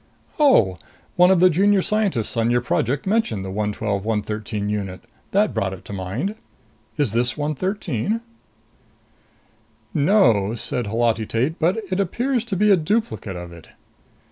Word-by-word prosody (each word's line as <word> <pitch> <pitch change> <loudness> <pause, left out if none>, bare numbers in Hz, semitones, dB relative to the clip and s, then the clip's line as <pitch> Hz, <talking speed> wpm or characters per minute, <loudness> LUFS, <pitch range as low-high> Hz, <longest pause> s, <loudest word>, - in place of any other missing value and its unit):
"Oh. 110 - +4 0.4
One 180 +1 +6
of 190 -2 +4
the 185 +1 +6
Junior 195 +3 +3
Scientists 205 - 0
on 115 0 +1
your 120 0 +2
Project 120 +3 -1
mentioned 190 - 0
the 95 - -5
112 105 0 -2
113 105 -1 -2
unit. 100 -3 -3 0.3
That 205 +2 +2
brought 95 -1 -1
it 95 - -11
to - - -8
mind. 100 - -3 0.6
Is 145 -8 +1
this 120 +3 0
113?" 180 - -2 1.7
"No," 125 - +3
said 120 0 -3
Holati 115 0 0
Tate. 130 +8 -1
"But 175 +6 +2
it 185 - 0
appears 240 +6 0
to 220 -5 -3
be 210 +3 +3
a - - +8
duplicate 180 - -2
of 85 -1 -7
it." 85 - -14
120 Hz, 145 wpm, -22 LUFS, -, 1.7 s, a